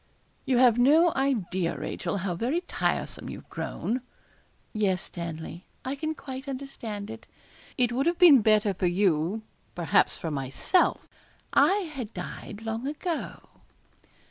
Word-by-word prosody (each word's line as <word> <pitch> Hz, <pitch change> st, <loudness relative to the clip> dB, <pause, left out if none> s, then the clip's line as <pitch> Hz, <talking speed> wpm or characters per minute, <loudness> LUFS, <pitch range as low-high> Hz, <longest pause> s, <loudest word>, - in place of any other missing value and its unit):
'You 255 Hz, -, +3 dB
have 245 Hz, -2 st, +5 dB
no 315 Hz, +7 st, +5 dB
idea, 190 Hz, -11 st, 0 dB
Rachel, 200 Hz, -, -3 dB
how 180 Hz, -, 0 dB
very 250 Hz, -, 0 dB
tiresome 360 Hz, -, -2 dB
you've -, -, -9 dB
grown.' 250 Hz, +3 st, -3 dB, 0.7 s
'Yes, 200 Hz, -4 st, +1 dB
Stanley, 170 Hz, +1 st, -7 dB, 0.2 s
I 260 Hz, -, -1 dB
can 310 Hz, +3 st, -3 dB
quite 265 Hz, -1 st, -7 dB
understand 235 Hz, -6 st, -5 dB
it. 225 Hz, 0 st, -10 dB, 0.5 s
It 245 Hz, -1 st, +2 dB
would 265 Hz, +5 st, 0 dB
have 340 Hz, 0 st, +2 dB
been 320 Hz, -9 st, +8 dB
better 215 Hz, -1 st, +3 dB
for 180 Hz, 0 st, 0 dB
you, 180 Hz, +2 st, +1 dB, 0.3 s
perhaps 170 Hz, -2 st, +2 dB
for 165 Hz, -, -4 dB
myself, 135 Hz, -, +1 dB, 0.5 s
I 385 Hz, -5 st, +3 dB
had 245 Hz, -6 st, -6 dB
died 210 Hz, +1 st, -7 dB
long 225 Hz, +3 st, -3 dB
ago.' 315 Hz, +3 st, -3 dB
230 Hz, 135 wpm, -27 LUFS, 190-275 Hz, 0.7 s, been